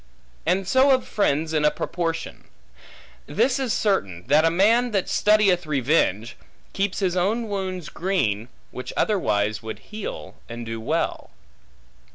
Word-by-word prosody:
And 185 +2 +1
so 260 +6 +4
of 255 - -5
friends 160 -6 0
in 155 -1 +1
a 150 - +6
proportion. 165 0 -4 0.8
This 265 +1 +1
is 260 -4 -1
certain, 100 - 0
that 150 +2 +4
a 165 - +4
man 220 +8 +3
that 195 -2 0
studieth 200 -5 +3
revenge, 130 - +1 0.4
keeps 195 0 -1
his 185 -2 +1
own 215 +6 0
wounds 185 -5 -4
green, 120 - -1 0.2
which 125 - -7
otherwise 110 - +1
would 110 -1 -6 0.2
heal, 215 -1 -6
and 120 0 -6
do 115 0 -5
well. - - -2
175 Hz, 140 wpm, -24 LUFS, 125-205 Hz, 0.8 s, a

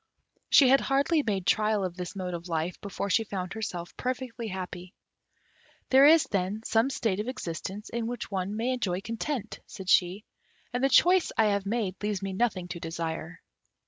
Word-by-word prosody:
She 275 - +7
had 270 +1 +6
hardly 280 +4 +2
made 200 -8 -2
trial 215 0 +2
of 175 -2 -5
this 180 +2 -6
mode 185 -2 -4
of 170 +1 -6
life 165 +1 -2
before 200 0 -4
she 225 - +3
found 185 -4 -5
herself 180 -6 -5
perfectly 250 -2 -3
happy. 185 -1 -7 1.0
"There 270 +2 +8
is, 320 +1 +7
then, 200 +3 -2
some 225 +4 +2
state 220 -7 -1
of 215 - -3
existence 195 -3 -5
in 230 -1 -3
which 245 -2 -5
one 195 +2 -2
may 235 +3 0
enjoy 195 -8 -1
content," 230 +1 -4
said 190 -3 -8
she; 185 +4 +3 0.5
"and 245 +1 -1
the 270 - +4
choice 360 +6 +5
I 215 -2 +4
have 200 -1 -1
made 200 -4 -2
leaves 205 -2 -2
me 195 -1 -3
nothing 190 -4 0
to 175 -1 -5
desire." 165 0 -5
205 Hz, 180 wpm, -28 LUFS, 180-240 Hz, 1.0 s, There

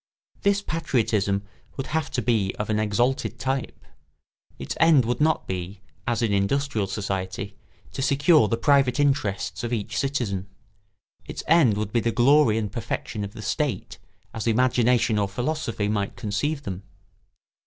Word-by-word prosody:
This 200 0 +2
patriotism 110 - 0 0.3
would 135 - -3
have 160 -1 -2
to 125 - -1
be 110 -5 +1
of 105 +1 -2
an 105 - +1
exalted 110 +1 0
type. 130 +3 -3 0.7
Its 70 +2 -5
end 155 -6 +5
would 120 +3 -1
not 160 +1 +2
be, 95 +2 -5 0.2
as 120 -1 0
in 110 -3 +1
industrial 105 +2 0
society, 100 0 -4 0.4
to - - -5
secure 140 -1 +4
the 115 - 0
private 140 +1 +3
interests 135 -11 0
of 120 - -3
each 110 -4 -3
citizen; 120 -9 -2 0.8
its - - -6
end 150 -10 +5
would 105 -1 -3
be 120 - +3
the 115 0 0
glory 125 -1 +4
and 105 -3 -2
perfection 110 -1 -4
of 100 0 -6
the 110 -2 -8
state 140 - -2 0.3
as 115 0 -4
imagination 120 -1 +3
or 100 - +1
philosophy 120 0 -2
might 105 -1 -1
conceive 140 +8 -2
them. 95 -6 -5
115 Hz, 155 wpm, -25 LUFS, 105-140 Hz, 0.8 s, end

